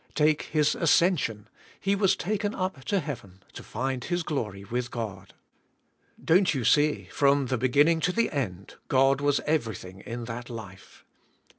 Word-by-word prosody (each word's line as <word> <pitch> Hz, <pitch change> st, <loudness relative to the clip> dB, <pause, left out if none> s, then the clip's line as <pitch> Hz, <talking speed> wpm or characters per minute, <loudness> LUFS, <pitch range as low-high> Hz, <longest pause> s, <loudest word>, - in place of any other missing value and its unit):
Take 155 Hz, 0 st, +3 dB
His 150 Hz, -1 st, +2 dB
ascension. 155 Hz, -, +2 dB, 0.3 s
He 195 Hz, +1 st, +1 dB
was 195 Hz, -1 st, +3 dB
taken 205 Hz, +2 st, -2 dB
up 185 Hz, -8 st, -3 dB
to 200 Hz, -2 st, +1 dB
heaven 100 Hz, -, -8 dB
to -, -, -8 dB
find 130 Hz, +2 st, -3 dB
His 175 Hz, -1 st, -1 dB
glory 105 Hz, -, -3 dB
with 120 Hz, +4 st, -3 dB
God. 100 Hz, -6 st, -6 dB, 0.9 s
Don't 180 Hz, 0 st, +4 dB
you 125 Hz, -4 st, -2 dB
see, 150 Hz, +4 st, +3 dB
from 140 Hz, -1 st, +3 dB
the 130 Hz, 0 st, -1 dB
beginning 145 Hz, +6 st, +3 dB
to 170 Hz, +3 st, +1 dB
the 230 Hz, +5 st, +1 dB
end, 100 Hz, -, -4 dB
God 135 Hz, +1 st, +3 dB
was 145 Hz, -1 st, +2 dB
everything 110 Hz, -, -2 dB
in 115 Hz, +3 st, -6 dB
that 120 Hz, +1 st, -6 dB
life. 100 Hz, -5 st, -10 dB
135 Hz, 155 wpm, -27 LUFS, 115-160 Hz, 0.9 s, Don't